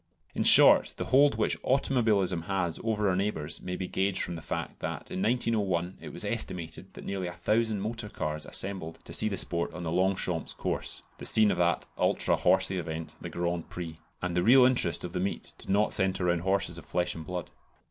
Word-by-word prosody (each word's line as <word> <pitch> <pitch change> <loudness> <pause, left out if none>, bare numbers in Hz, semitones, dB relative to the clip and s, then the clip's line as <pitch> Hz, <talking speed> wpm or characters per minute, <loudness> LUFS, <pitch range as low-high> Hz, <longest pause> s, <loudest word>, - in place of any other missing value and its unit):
In - - -2
short, - - +7
the - - -3
hold 140 -2 +4
which 110 - 0
automobilism 110 -10 +1
has 90 -4 -1
over 110 -2 0
our 95 - +2
neighbours 90 -6 -3
may 90 0 -4
be 95 0 -4
gauged 95 +1 0
from - - -3
the 85 - -7
fact - - -5
that - - -5
in 95 - -3
1901 100 -7 0
it - - -8
was - - -4
estimated 85 +2 -3
that - - -9
nearly 95 -2 -3
a 90 - -6
thousand 110 +2 0
motor 110 0 -4
cars 75 -4 -4
assembled 95 -4 -3
to - - -10
see 110 - +4
the 100 - -3
sport 85 -1 -1
on 90 - -6
the 80 - -3
Longchamps 90 -2 0
Course - - -3 0.2
(the - - -7
scene 110 -2 +5
of 90 - -2
that 85 0 +1
ultra - - +2
"horsey" 95 0 +3
event, 80 -1 -6
the 85 - -6
Grand 85 0 -3
Prix), 80 -2 -7 0.2
and 90 -1 -2
the 90 - +2
real 125 +6 +7
interest 125 -10 +2
of 90 - -6
the 90 - -2
meet 95 +2 -3
did - - -12
not 105 +2 +2
centre 95 -1 +1
round 85 -1 +1
horses 95 -2 -1
of - - -14
flesh 90 0 -1
and 80 - -7
blood. 90 +1 -6
95 Hz, 210 wpm, -28 LUFS, 85-105 Hz, 0.2 s, short